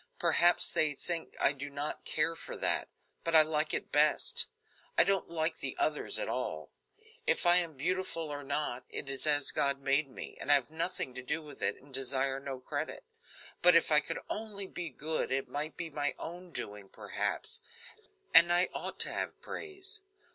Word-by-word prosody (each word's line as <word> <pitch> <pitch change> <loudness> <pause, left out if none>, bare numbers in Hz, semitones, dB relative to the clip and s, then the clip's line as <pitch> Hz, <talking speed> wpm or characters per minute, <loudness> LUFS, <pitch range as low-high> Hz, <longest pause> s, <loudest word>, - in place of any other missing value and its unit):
Perhaps 175 +1 +3
they 150 -2 +4
think 170 +3 -4
I - - +4
do 145 0 -6
not 145 +1 -4
care 165 +2 0
for - - -6
that; - - +2 0.4
but 165 -1 +1
I 155 - +11
like 155 0 0
it - - -3
best. 460 - +3 0.5
I - - +8
don't 195 -3 0
like 160 -1 -1
the 130 - -4
others 155 -1 +1
at - - -2
all. - - -3 0.6
If - - +1
I 175 0 +6
am 170 -5 +1
beautiful 175 +1 -2
or 145 - -5
not, 140 -3 -2
it - - -4
is 135 +2 +1
as 145 -2 +6
God 140 -1 +1
made 140 +1 +1
me, 130 - -9
and - - -6
I - - +10
have 140 +1 -1
nothing 165 -5 -3
to 130 - -7
do 150 +5 -3
with 145 -2 -13
it, - - 0
and 140 0 -19
desire 135 +1 0
no 135 -1 -6
credit, 130 - -5 0.6
but 180 -1 +6
if 170 - +3
I 150 - +7
could 165 +2 -4
only 210 -2 -5
be 175 -3 -5
good 155 +3 -3
it 135 0 0
might 145 +5 -4
be 165 -1 -5
my 145 0 -2
own 175 +1 -9
doing, 105 -8 -7
perhaps, 460 +1 -4 0.7
and 170 0 +9
I 175 +1 +4
ought - - -5
to - - +1
have - - -4
praise. 395 +1 -6
155 Hz, 190 wpm, -31 LUFS, 140-175 Hz, 0.7 s, I